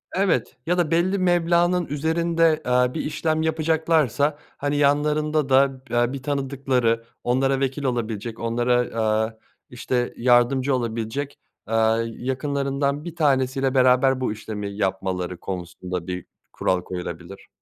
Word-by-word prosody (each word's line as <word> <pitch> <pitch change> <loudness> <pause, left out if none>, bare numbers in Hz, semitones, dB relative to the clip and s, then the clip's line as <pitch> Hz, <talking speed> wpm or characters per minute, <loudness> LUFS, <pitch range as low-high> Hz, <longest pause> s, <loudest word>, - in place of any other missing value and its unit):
Evet 180 - 0
ya 180 +2 +1
da 170 -3 +1
belli 175 +4 +2
meblağnın 175 0 +2
üzerinde, 160 +2 +1
eee, 125 0 +2
bir - - -2
işlem 155 +1 -1
yapacaklarsa, 160 -3 +1 0.2
hani, 145 +1 -1
yanlarında 150 0 +2
da, 135 0 +3
eee, 120 +1 +1
bir 135 -2 -6
tanıdıkları, 135 -5 0 0.2
onlara 135 +2 +1
vekil 135 +1 -2
olabilecek, 115 -3 -3
onlara, 120 +2 0 0.3
aaa, 110 +1 0 0.3
işte, 125 0 -2
yardımcı 130 +2 +3
olabilecek, 120 +4 -3 0.3
aaa, 115 0 +2
yakınlarından 140 +3 -2
1 170 -2 -7
tanesiyle 135 -3 +1
beraber 130 0 +4
bu 130 - 0
işlemi 105 -2 -6
yapmaları 95 -2 -2
konusunda 90 0 -5
bir 90 -1 -4 0.3
kural 90 -1 0
koyulabilir. 90 +1 -7
130 Hz, 125 wpm, -23 LUFS, 115-150 Hz, 0.3 s, beraber